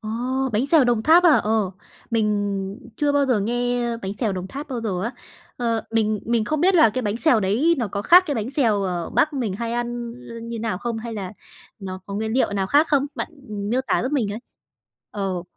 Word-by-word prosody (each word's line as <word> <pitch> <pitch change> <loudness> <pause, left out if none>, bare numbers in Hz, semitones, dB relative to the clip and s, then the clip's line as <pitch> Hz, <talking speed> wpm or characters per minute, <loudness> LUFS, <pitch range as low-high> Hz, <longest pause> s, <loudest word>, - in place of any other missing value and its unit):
ồ! 215 - -7 0.4
Bánh 225 +6 +1
xèo 305 -2 +5
Đồng 240 -3 +1
Tháp 330 +7 +6
à? 340 - +8
Ờ, 215 -3 +1 0.4
mình 205 -2 -1 0.2
chưa 290 -1 +1
bao 285 -1 +2
giờ 245 -5 +2
nghe 245 +2 0
bánh 195 -3 -5
xèo 220 -5 0
Đồng 185 0 -4
Tháp 285 +6 -7
bao 250 -4 -3
giờ 190 -5 -2
á. 235 +4 -2 0.4
Ờ, 230 -2 0
mình 215 -1 +1
mình 230 -1 +1
không 305 +6 -1
biết 375 +2 +4
là 270 -10 +6
cái 255 +4 -3
bánh 210 +1 -1
xèo 250 -4 +3
đấy 235 - +2
nó 230 -4 -1
có 200 0 -2
khác 355 - +7
cái 290 - -1
bánh 225 +1 -3
xèo 230 -8 +1
ở 180 -3 -3
Bắc 305 - +2
mình 245 -8 -2
hay 230 +3 -3
ăn, 240 0 -3 0.2
ơ, - - -8
như 230 0 -5
nào 220 -4 -2
không? 235 0 -3
Hay 230 0 -6
là 195 -3 -5 0.5
nó 185 -2 -6
có 200 - -6
nguyên 220 +2 -2
liệu 250 -4 +1
nào 195 -1 0
khác 290 +8 +4
không? 285 -1 +2
Bạn - - -4 0.4
miêu 255 +2 +2
tả 215 - +1
giúp 260 +4 -2
mình 225 -8 0
ấy. 215 - -5 0.7
Ờ. 190 -4 -3
230 Hz, 230 wpm, -23 LUFS, 205-255 Hz, 0.7 s, à